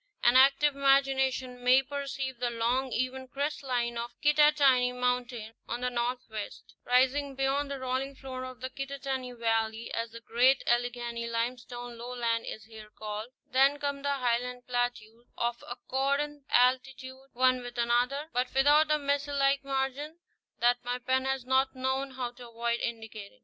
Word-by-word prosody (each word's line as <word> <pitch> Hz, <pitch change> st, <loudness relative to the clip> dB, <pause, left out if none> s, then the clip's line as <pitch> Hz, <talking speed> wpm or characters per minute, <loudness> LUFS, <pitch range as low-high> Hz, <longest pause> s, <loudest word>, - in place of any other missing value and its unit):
An 240 Hz, +1 st, +5 dB
active 275 Hz, +2 st, +5 dB
imagin 275 Hz, -1 st, +3 dB
ation 255 Hz, -2 st, -1 dB
may 255 Hz, +2 st, +6 dB
perceive 270 Hz, -2 st, -4 dB
the 245 Hz, -1 st, 0 dB
long 240 Hz, +3 st, 0 dB
even 255 Hz, +2 st, -2 dB
crest 285 Hz, +3 st, -3 dB
line 240 Hz, -3 st, -1 dB
of 240 Hz, +1 st, -7 dB
Kittatinny 295 Hz, -4 st, +4 dB
Mountain 250 Hz, -3 st, -2 dB
on 240 Hz, +1 st, -4 dB
the 250 Hz, 0 st, -1 dB
northwest, 240 Hz, -3 st, -4 dB
rising 265 Hz, +3 st, +2 dB
beyond 270 Hz, +2 st, 0 dB
the 280 Hz, -, -3 dB
rolling 260 Hz, +2 st, -2 dB
floor 260 Hz, -1 st, -7 dB
of 255 Hz, -1 st, -8 dB
the 260 Hz, 0 st, -4 dB
Kittatinny 270 Hz, -2 st, -4 dB
Valley, 225 Hz, 0 st, -1 dB
as 230 Hz, 0 st, -2 dB
the 230 Hz, +1 st, -10 dB
great 245 Hz, +4 st, +3 dB
Alleghany 240 Hz, -1 st, -1 dB
limestone 240 Hz, 0 st, -4 dB
lowland 235 Hz, -1 st, -2 dB
is 215 Hz, -, -6 dB
here 220 Hz, -1 st, -12 dB
called; 215 Hz, +1 st, -6 dB, 0.2 s
then 275 Hz, +2 st, +4 dB
come 285 Hz, -1 st, -3 dB
the 285 Hz, 0 st, 0 dB
Highland 250 Hz, -1 st, -1 dB
plateaus, 245 Hz, -2 st, -3 dB
of 235 Hz, 0 st, -2 dB
accordant 280 Hz, +3 st, -2 dB
altitude 260 Hz, +1 st, +1 dB
one 255 Hz, 0 st, +3 dB
with 245 Hz, 0 st, -8 dB
another, 245 Hz, +5 st, +1 dB
but 250 Hz, +1 st, 0 dB
without 295 Hz, +3 st, +5 dB
the 305 Hz, 0 st, +3 dB
mesa 285 Hz, 0 st, -1 dB
like 275 Hz, 0 st, +2 dB
margin 275 Hz, +3 st, -2 dB, 0.4 s
that 245 Hz, +1 st, +2 dB
my 245 Hz, +1 st, -2 dB
pen 260 Hz, +1 st, 0 dB
has 265 Hz, -2 st, -1 dB
not 265 Hz, +1 st, +2 dB
known 265 Hz, +1 st, -1 dB
how 255 Hz, -2 st, -4 dB
to 245 Hz, -1 st, -12 dB
avoid 235 Hz, +1 st, -1 dB
indicating. 220 Hz, -1 st, -6 dB
255 Hz, 160 wpm, -29 LUFS, 240-270 Hz, 0.4 s, may